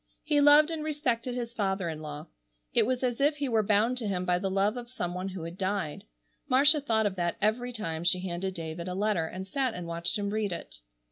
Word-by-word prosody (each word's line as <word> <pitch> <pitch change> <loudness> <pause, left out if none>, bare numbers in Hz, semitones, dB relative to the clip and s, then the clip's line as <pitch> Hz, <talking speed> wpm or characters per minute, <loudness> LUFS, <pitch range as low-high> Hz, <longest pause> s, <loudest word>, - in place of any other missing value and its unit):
He 295 -1 +2
loved 295 +2 +7
and 320 -2 -3
respected 260 -6 -1
his 235 -1 -4
father 195 -5 -1
in 155 -1 -5
law. 150 0 -7 0.5
It - - +4
was 255 0 -1
as 245 0 0
if 290 +2 +3
he 285 -1 -2
were 225 -3 +2
bound 215 +4 +2
to 225 - -3
him 185 -2 -1
by 180 0 +2
the 195 - -1
love 195 +3 +1
of 240 -1 -7
some 175 -8 -3
one 185 +1 -3
who 185 -3 -6
had 170 +2 -8
died. 190 -5 -2 0.4
Marcia 290 +4 +6
thought 225 -5 +2
of 200 -2 0
that 175 -1 -1
every 230 +4 0
time 165 -8 -3
she 180 +1 +3
handed 185 +1 -3
David 165 +1 -5
a 180 - -3
letter, 195 -5 +1
and 190 +3 -7
sat 255 +3 -1
and 175 - -5
watched 170 +2 -2
him 200 -1 -2
read 215 -2 -1
it. 170 - -6
205 Hz, 240 wpm, -29 LUFS, 180-245 Hz, 0.5 s, loved